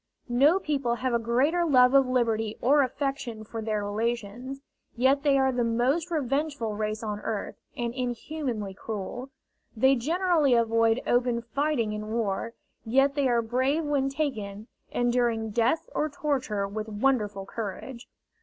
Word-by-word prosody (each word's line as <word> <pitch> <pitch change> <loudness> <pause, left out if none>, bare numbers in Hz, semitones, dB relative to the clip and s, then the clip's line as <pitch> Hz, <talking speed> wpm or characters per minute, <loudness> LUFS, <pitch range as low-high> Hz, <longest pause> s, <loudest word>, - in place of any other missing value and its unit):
No 280 +9 +5
people 280 -9 -1
have 255 0 -2
a 235 - +3
greater 260 +10 +2
love 255 -5 +5
of 270 -1 +5
liberty 225 -4 0
or 285 +4 +4
affection 265 -4 -3
for 225 +1 -6
their 215 -2 -2
relations, 235 +4 -3 0.4
yet 265 +3 +3
they 280 -1 +3
are 265 0 +3
the 245 -1 0
most 250 +9 +1
revengeful 285 -6 -1
race 215 +1 -3
on 210 -1 -3
earth, 210 -1 -3 0.2
and 235 -1 -2
inhumanly 245 -4 -3
cruel. 220 +6 -6 0.5
They 265 +4 +5
generally 315 0 +2
avoid 230 0 +2
open 240 -1 +1
fighting 260 -3 -1
in 210 0 -5
war, 225 0 -2 0.3
yet 270 +5 +3
they 280 -2 +1
are 235 -2 +2
brave 260 +7 0
when 285 -2 0
taken, 220 -8 -3 0.2
enduring 240 -2 0
death 235 +8 +1
or 305 - 0
torture 260 -9 -1
with 215 +2 -5
wonderful 210 -3 0
courage. 230 +4 -6
240 Hz, 145 wpm, -27 LUFS, 220-275 Hz, 0.5 s, No